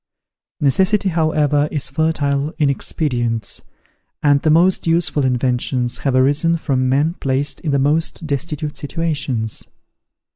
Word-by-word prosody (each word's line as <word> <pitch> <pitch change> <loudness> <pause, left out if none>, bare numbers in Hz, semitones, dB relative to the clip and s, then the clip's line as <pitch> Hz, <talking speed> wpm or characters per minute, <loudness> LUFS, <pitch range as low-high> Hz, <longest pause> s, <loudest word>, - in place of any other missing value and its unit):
Necessity, 190 +7 +2
however, 150 -3 +1
is 145 -3 0
fertile 145 -1 0
in 145 -4 +2
expedients, 120 -7 -2 0.6
and 145 -1 +4
the 155 - +1
most 175 +3 +3
useful 165 -3 +2
inventions 125 -1 -1
have 135 -2 0
arisen 145 +6 +3
from 130 -5 0
men 145 +5 +2
placed 135 +1 -1
in 160 - -4
the 140 - +2
most 155 +4 0
destitute 150 0 -3
situations. 140 -7 -2
145 Hz, 120 wpm, -19 LUFS, 135-160 Hz, 0.6 s, and